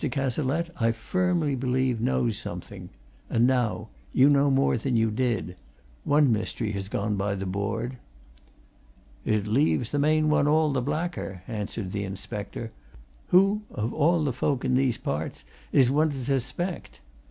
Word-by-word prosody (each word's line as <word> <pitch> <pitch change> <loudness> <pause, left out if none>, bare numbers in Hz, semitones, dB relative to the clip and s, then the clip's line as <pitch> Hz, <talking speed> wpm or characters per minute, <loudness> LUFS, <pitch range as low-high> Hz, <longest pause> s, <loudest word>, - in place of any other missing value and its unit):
Cazalette, 140 +4 -1
I 115 0 +3
firmly 170 +4 0
believe, 130 -2 0
knows 65 - +1
something. - - -7 0.4
And 115 +1 +3
now 125 -3 0 0.2
you 135 +3 +5
know 140 0 +4
more 135 0 +3
than 125 +2 -1
you 115 -1 +2
did. 105 -7 -1 0.5
One 145 -3 +4
mystery 110 0 -1
has 100 -2 -4
gone 105 0 -1
by 100 +1 -1
the 95 0 -4
board." 105 +6 -3 1.3
"It 105 -2 +1
leaves 120 +1 +1
the 145 - 0
main 155 +1 +3
one 150 -1 +3
all 155 -1 +3
the 130 - +1
blacker," 145 - -3
answered 105 -3 -4
the 100 0 -2
inspector. 100 +3 -6 0.6
"Who, 195 +3 +4
of 110 +3 -3
all 165 +2 +3
the 140 -4 0
folk 135 +2 -1
in 130 - +1
these 125 -2 +2
parts, 75 +2 -4 0.3
is 130 -2 +5
one 155 +3 +3
to 140 - -5
suspect? 135 - -3
125 Hz, 155 wpm, -26 LUFS, 105-145 Hz, 1.3 s, you